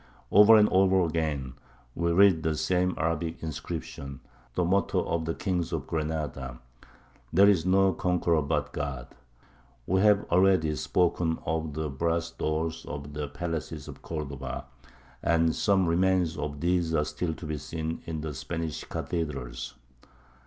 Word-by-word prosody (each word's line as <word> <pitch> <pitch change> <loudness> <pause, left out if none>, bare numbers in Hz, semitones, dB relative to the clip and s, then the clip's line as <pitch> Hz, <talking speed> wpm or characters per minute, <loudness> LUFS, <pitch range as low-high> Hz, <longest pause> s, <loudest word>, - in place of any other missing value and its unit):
Over 105 +3 +8
and 105 -1 +6
over 95 0 +4
again 75 -5 -2 0.4
we 85 +3 0
read 95 -2 +5
the 80 -1 0
same 90 +4 +1
Arabic 80 0 -2
inscription, 70 -3 -6 0.3
the 90 - +1
motto 95 +3 +1
of 85 -1 -1
the 80 - -2
kings 90 -4 -1
of - - -2
Granada, 75 -5 -3 0.7
"There 95 +5 +6
is 95 -4 +3
no 95 0 +4
conqueror 85 -2 +1
but 75 0 -1
God." 70 -4 -4 0.8
We 95 +5 +2
have 105 -1 +4
already 90 -4 +4
spoken 85 0 +1
of 80 -2 -2
the 80 0 -2
brass 85 +4 -1
doors 80 +1 -2
of 70 0 -6
the 75 0 -3
palaces 80 -1 -5
of - - -10
Cordova; 70 -5 -5 0.6
and 80 0 +2
some 95 -2 +3
remains 90 -1 +2
of 75 -1 -4
these 85 -1 +1
are 75 -1 +2
still 80 0 -3
to 85 - -9
be 75 -1 -3
seen 80 +2 -4
in 80 -2 -3
the 75 -1 -4
Spanish 80 +2 -4
cathedrals. 70 -7 -4
80 Hz, 145 wpm, -28 LUFS, 75-90 Hz, 0.8 s, Over